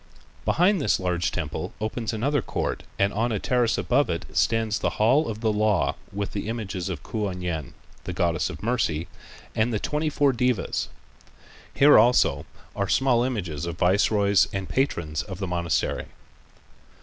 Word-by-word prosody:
Behind 180 +2 +3
this - - +2
large 90 -2 0
temple - - -4
opens 110 +2 -3
another 135 +5 0
court - - -3 0.2
and 100 +1 +2
on 115 +3 0
a 110 - 0
terrace 120 +2 +1
above - - +2
it - - -2
stands 110 -2 +1
the - - +1
hall 125 +8 +3
of 110 0 -5
the 110 -2 +1
Law 105 -2 +2 0.2
with 100 0 -3
the 105 - -4
images 100 -5 -4
of 85 -6 -5
Kuan 100 -5 -3
Yin, 80 -5 -4 0.3
the - - -3
goddess 85 -2 0
of - - -9
Mercy, 105 -9 0 0.5
and 110 +2 +1
the 110 - 0
twenty 150 +5 -1
four 145 -2 +2
devas. 125 -3 0 0.8
Here 145 -2 +7
also 120 +3 +3 0.3
are 100 -2 -1
small 130 -3 +3
images 90 - -3
of 85 0 -5
viceroys 100 +2 +3
and 95 -1 -4
patrons 85 - -1
of 95 -4 -7
the 95 - -3
monastery. 85 -5 -1
105 Hz, 160 wpm, -25 LUFS, 90-120 Hz, 0.8 s, Here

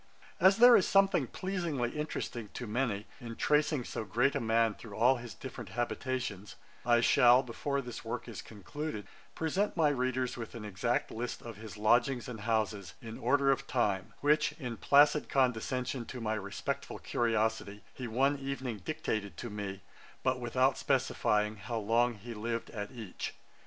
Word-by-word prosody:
As 190 +2 +6
there 245 +1 +9
is - - +4
something 195 -8 +4
pleasingly 170 -8 -2
interesting, 125 -7 -4
to 125 - -4
many, 110 -2 -1
in 115 -3 -7
tracing 150 -1 +2
so 115 - -4
great 120 +7 +2
a 140 - 0
man 115 -2 +2
through 105 -1 -11
all 125 +4 +4
his 120 -2 -8
different - - -8
habitations, 120 -4 -3 0.3
I 120 -1 +4
shall, 125 +2 +6
before 140 +3 -2
this 120 -3 -7
work 120 +2 -4
is 115 -4 -6
concluded, 110 - -6 0.3
present 185 +6 0
my 155 -3 +4
readers 130 -2 -1
with 115 -1 -7
an 110 -2 -6
exact 105 +4 -1
list 120 +2 -4
of 115 -3 -8
his 110 -1 -9
lodgings 120 +4 +2
and 120 -3 -6
houses, 110 -3 -1
in 115 -1 -8
order 135 +2 +3
of 135 0 -1
time, 100 -7 0
which, 150 +1 +3
in 125 -7 -6
placid 145 +1 +5
condescension 125 -1 0
to 130 - -6
my 110 -2 -1
respectful 100 -2 -4
curiosity, 110 -3 -1
he 125 0 -6
one 135 +5 +2
evening 135 -4 -4
dictated 110 - -3
to 120 - -6
me, 100 -2 -5 0.4
but 130 0 +1
without 130 +2 +1
specifying 105 0 +1
how 110 +4 -4
long 115 +3 +2
he 115 +3 -8
lived 115 +2 -3
at 105 -2 -5
each. 110 -7 -6
120 Hz, 165 wpm, -32 LUFS, 110-135 Hz, 0.4 s, there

